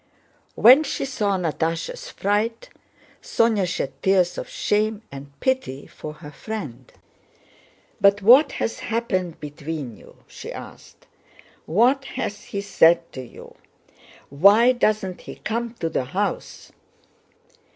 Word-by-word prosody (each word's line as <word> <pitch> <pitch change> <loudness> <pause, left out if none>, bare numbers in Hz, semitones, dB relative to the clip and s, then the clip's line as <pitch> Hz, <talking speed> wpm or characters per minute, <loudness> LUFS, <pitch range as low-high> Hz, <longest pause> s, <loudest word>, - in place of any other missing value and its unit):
When 255 +7 +7
she 275 - -3
saw 210 -7 -1
Natásha's 170 - -3
fright, 220 - -1 0.5
Sónya 220 -5 +1
shed 155 -5 -3
tears 185 -2 +2
of - - -7
shame 215 +1 -1
and 140 +1 -10
pity 260 - -1
for 155 - -9
her 150 -1 -12
friend. 145 - -7 1.1
"But 200 +1 +4
what 265 +7 +7
has 225 - -3
happened 185 -7 -2
between 145 -4 -6
you?" - - -17
she - - -9
asked. - - -12 0.6
"What 250 - +3
has 250 -6 -5
he 200 - -4
said 170 -4 +3
to 130 - -7
you? 125 - -13 0.8
Why 200 - +6
doesn't 215 -6 0
he - - -9
come 235 +1 -4
to 165 - -3
the 160 -5 -2
house?" 195 +9 -4
200 Hz, 120 wpm, -23 LUFS, 160-230 Hz, 1.1 s, When